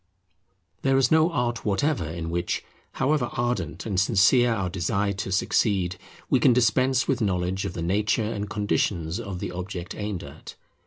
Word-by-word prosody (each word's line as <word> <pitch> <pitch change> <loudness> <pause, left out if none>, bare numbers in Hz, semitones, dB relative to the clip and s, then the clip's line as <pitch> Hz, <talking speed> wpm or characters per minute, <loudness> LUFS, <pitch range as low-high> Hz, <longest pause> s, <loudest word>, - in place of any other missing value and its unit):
There 135 0 +3
is 130 -2 +3
no 160 +2 +4
art 120 -5 -1
whatever 105 - 0
in 85 0 -5
which, 85 +1 -2 0.3
however 145 -4 +1
ardent 95 -9 -2
and 100 -4 0
sincere 115 +5 +4
our 100 -5 -1
desire 100 +3 -1
to 95 0 -4
succeed, 95 -2 +1 0.3
we - - +3
can 125 - +5
dispense 125 +2 +2
with 130 -3 0
knowledge 95 -2 0
of - - -4
the 85 - -4
nature 105 +6 +1
and 105 -2 -3
conditions 100 -4 -1
of 100 -5 -5
the - - -4
object 90 0 -6
aimed 105 -3 -4
at. 70 +3 -11
100 Hz, 165 wpm, -25 LUFS, 90-120 Hz, 0.3 s, can